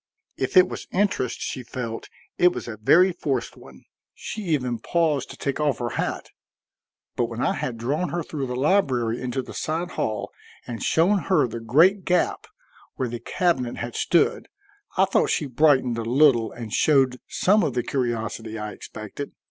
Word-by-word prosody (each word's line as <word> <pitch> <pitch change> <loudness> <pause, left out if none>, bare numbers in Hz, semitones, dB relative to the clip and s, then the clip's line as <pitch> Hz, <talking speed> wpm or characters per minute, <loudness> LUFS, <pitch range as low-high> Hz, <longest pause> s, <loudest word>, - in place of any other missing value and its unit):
If - - -1
it 185 0 +8
was - - -7
interest 185 - 0
she 130 - -4
felt 120 -2 -6 0.3
it 180 0 +6
was - - -6
a 115 -2 -6
very 175 - +5
forced 140 -7 -3
one. 65 -1 -15 0.3
She 215 - -6
even 125 -8 0
paused 155 0 0
to - - -10
take 140 +1 -2
off 150 -2 +1
her 120 -1 -2
hat. - - -3 0.8
But - - +1
when - - -7
I - - +2
had 120 -2 -4
drawn 145 +10 -1
her 175 -1 -2
through 145 -3 -4
the 125 - -4
library 130 - +1
into 130 +1 -2
the - - -10
side 165 +3 -3
hall, 105 -2 -3 0.3
and 115 -2 -6
shown 185 +5 +3
her 175 -9 +3
the 115 0 -6
great 165 - +4
gap 180 -1 0 0.5
where 130 - -2
the 120 0 -5
cabinet 130 -3 0
had 120 -1 -5
stood, 170 - +2 0.5
I 190 - +5
thought 195 - +1
she 150 - 0
brightened 130 -3 +3
a - - -2
little 120 -2 +4
and 115 -3 -8
showed 135 -4 +3
some 210 +3 +3
of 145 -8 -1
the 125 - 0
curiosity 115 -3 -3
I 105 0 -5
expected. 110 +7 -8
130 Hz, 180 wpm, -24 LUFS, 120-165 Hz, 0.8 s, it